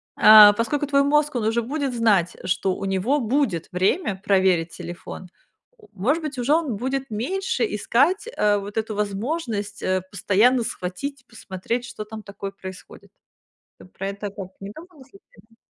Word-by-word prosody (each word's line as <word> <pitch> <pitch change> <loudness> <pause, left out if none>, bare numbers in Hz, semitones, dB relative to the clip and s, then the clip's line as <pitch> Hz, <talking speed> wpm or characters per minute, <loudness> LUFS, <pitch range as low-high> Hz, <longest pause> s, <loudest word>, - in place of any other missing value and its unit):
а, 215 -1 +9
поскольку 235 +7 -1
твой 280 0 +3
мозг, 295 +1 +2
он 235 -3 -1
уже 230 +2 +1
будет 275 +1 -3
знать, 205 -7 +2
что 185 +1 0
у 195 - -5
него 195 +9 0
будет 230 - -1
время 190 - 0
проверить 185 -4 +2
телефон, 175 +1 -9 0.5
о 430 - -19
может 250 - 0
быть, 300 -3 -5
уже 250 +4 +1
он 310 -8 0
будет 265 +4 -3
меньше 255 - -1
искать, 280 - +1
а, 205 -1 +3
вот 200 +2 -8
эту 220 0 -2
возможность, 210 0 -3
э, 185 -1 0
постоянно 225 +5 +3
схватить, 240 +8 -5
посмотреть, 225 +2 -5
что 215 - -8
там 220 +1 -8
такое 200 -1 -7
происходит. 190 -1 -11 0.7
Ты - - -14
про 190 +1 -6
это 200 +1 -5
как, 195 -2 -8
не 195 0 -7
думала 330 -3 -14
случайно? 280 - -22
220 Hz, 160 wpm, -23 LUFS, 195-275 Hz, 0.7 s, а